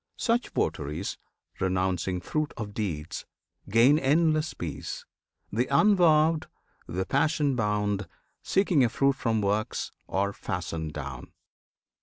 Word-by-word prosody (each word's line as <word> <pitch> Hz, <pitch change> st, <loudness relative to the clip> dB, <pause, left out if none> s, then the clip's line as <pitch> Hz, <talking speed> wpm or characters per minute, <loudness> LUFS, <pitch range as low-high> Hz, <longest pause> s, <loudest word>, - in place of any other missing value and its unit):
Such 235 Hz, 0 st, +1 dB
votaries, 75 Hz, +7 st, -2 dB, 0.4 s
renouncing 95 Hz, -1 st, 0 dB
fruit 155 Hz, -, -2 dB
of 105 Hz, -3 st, -5 dB
deeds, 85 Hz, -7 st, -4 dB, 0.4 s
Gain 120 Hz, +8 st, +5 dB
endless 155 Hz, +2 st, +2 dB
peace: 75 Hz, -4 st, -5 dB, 0.5 s
the 120 Hz, +4 st, +1 dB
unvowed, 160 Hz, -2 st, +4 dB, 0.4 s
the 95 Hz, +2 st, -2 dB
passion 145 Hz, -, +2 dB
bound, 105 Hz, -3 st, 0 dB, 0.3 s
Seeking 185 Hz, -8 st, +3 dB
a 120 Hz, -, +3 dB
fruit 140 Hz, +4 st, +2 dB
from 115 Hz, -4 st, 0 dB
works, 105 Hz, +2 st, -1 dB, 0.2 s
are 100 Hz, +1 st, 0 dB
fastened 80 Hz, -5 st, -4 dB
down. 70 Hz, -4 st, -7 dB
110 Hz, 110 wpm, -28 LUFS, 95-150 Hz, 0.5 s, Gain